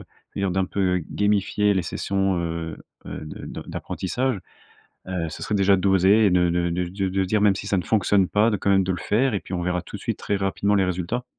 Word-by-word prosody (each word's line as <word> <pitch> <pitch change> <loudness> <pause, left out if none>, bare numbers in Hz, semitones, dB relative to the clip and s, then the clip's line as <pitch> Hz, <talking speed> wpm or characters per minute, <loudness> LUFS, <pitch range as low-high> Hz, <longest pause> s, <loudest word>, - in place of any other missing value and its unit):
va - - -13 0.3
dire 100 -1 +1
d'un 95 +1 +1
peu 90 -1 0
gamifier 105 0 +1
les 95 - +1
sessions, 95 +3 -1
heu, 85 -1 -3 0.3
heu, - - -6
de 75 - -8
de - - -7
d'apprentissage. 125 +4 -2 0.7
Heu, 90 -3 -2
ce - - -8
serait 105 - -2
déjà 100 0 +4
d'oser 95 +2 +4
de 90 -1 +3
de 85 0 0
de 90 +1 -1
de 95 +2 -2
de 95 +1 0
dire 105 +3 +1
même 100 -2 +4
si 100 - -6
ça 100 - +1
ne - - -1
fonctionne 100 -3 +2
pas, 105 +2 +3
de, 105 - +1
quand 100 - 0
même, 95 -1 +4
de 95 - 0
le 90 - -4
faire 115 +8 +1
et 100 - -1
puis - - -12
on 90 - -2
verra 90 0 -1
tout - - -8
de - - -11
suite - - -2
très 100 - -1
rapidement 100 +1 0
les 95 - +3
résultats. 90 +7 -2
95 Hz, 240 wpm, -24 LUFS, 90-105 Hz, 0.7 s, déjà